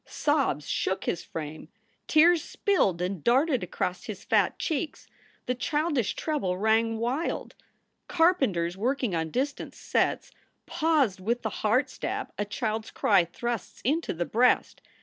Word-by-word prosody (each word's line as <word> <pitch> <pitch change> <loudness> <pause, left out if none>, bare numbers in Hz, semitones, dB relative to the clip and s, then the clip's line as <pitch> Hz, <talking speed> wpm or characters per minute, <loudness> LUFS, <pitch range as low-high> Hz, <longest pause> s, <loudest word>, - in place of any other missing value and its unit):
Sobs 275 - 0
shook 190 - -1
his 170 - -2
frame. 155 0 -7 0.4
Tears 325 +1 +5
spilled 195 - +1
and 180 -3 -3
darted 265 +3 +3
across - - -3
his - - -7
fat - - +2
cheeks. 315 -1 -3 0.4
The 250 - 0
childish 290 -1 0
treble 270 - -1
rang 220 +2 +2
wild. 250 +8 -2 0.5
Carpenters 265 - +2
working 245 +1 -1
on 160 -1 -1
distant 275 - -3
sets - - 0 0.3
paused 305 - +1
with 235 +6 -1
the 220 - -2
heart 225 +6 +3
stab - - -4
a 205 - 0
child 220 +1 -2
s - - -10
cry 195 -4 +3
thrusts 235 +6 -5
into 310 +6 0
the 175 +1 -2
breast. 245 +6 +2
235 Hz, 140 wpm, -27 LUFS, 190-295 Hz, 0.5 s, Tears